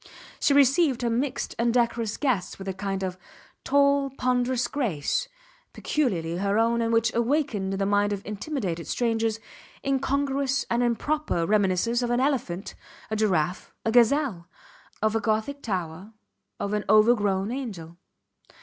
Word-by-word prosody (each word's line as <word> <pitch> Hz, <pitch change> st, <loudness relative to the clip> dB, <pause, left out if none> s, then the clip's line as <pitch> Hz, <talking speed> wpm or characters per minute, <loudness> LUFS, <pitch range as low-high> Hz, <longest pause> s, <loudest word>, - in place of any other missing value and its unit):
She 280 Hz, -, +3 dB
received 275 Hz, -1 st, +4 dB
her 235 Hz, -, +1 dB
mixed 255 Hz, +4 st, -2 dB
and 235 Hz, 0 st, +2 dB
decorous 235 Hz, -2 st, 0 dB
guests 250 Hz, -11 st, -1 dB
with 195 Hz, -, -9 dB
a 190 Hz, -, -2 dB
kind 195 Hz, 0 st, -3 dB
of 185 Hz, -1 st, -4 dB, 0.4 s
tall, 280 Hz, 0 st, +3 dB
ponderous 250 Hz, 0 st, +1 dB
grace, 235 Hz, -, -1 dB, 0.5 s
peculiarly 175 Hz, -, -1 dB
her 200 Hz, +2 st, 0 dB
own 230 Hz, +1 st, +2 dB
and 230 Hz, 0 st, 0 dB
which 230 Hz, -1 st, +2 dB
awakened 235 Hz, -6 st, 0 dB
in -, -, -2 dB
the 195 Hz, -, 0 dB
mind 205 Hz, +1 st, +2 dB
of 200 Hz, -1 st, -4 dB
intimidated 210 Hz, -, -4 dB
strangers 225 Hz, -2 st, 0 dB, 0.5 s
incongruous 275 Hz, 0 st, 0 dB
and 235 Hz, +1 st, +2 dB
improper 245 Hz, -, 0 dB
reminiscences 205 Hz, +4 st, +2 dB
of 240 Hz, -, -1 dB
an 240 Hz, 0 st, +1 dB
elephant, 245 Hz, -10 st, -1 dB, 0.4 s
a -, -, 0 dB
giraffe, 185 Hz, -5 st, 0 dB
a 225 Hz, -, +2 dB
gazelle; 240 Hz, -, +3 dB, 0.6 s
of 215 Hz, 0 st, +2 dB
a -, -, +3 dB
gothic 220 Hz, +7 st, -1 dB
tower 185 Hz, -, -4 dB, 0.5 s
of 200 Hz, -, -2 dB
an 210 Hz, 0 st, 0 dB
overgrown 210 Hz, -2 st, +3 dB
angel. 195 Hz, -11 st, -6 dB
230 Hz, 145 wpm, -26 LUFS, 195-260 Hz, 0.6 s, received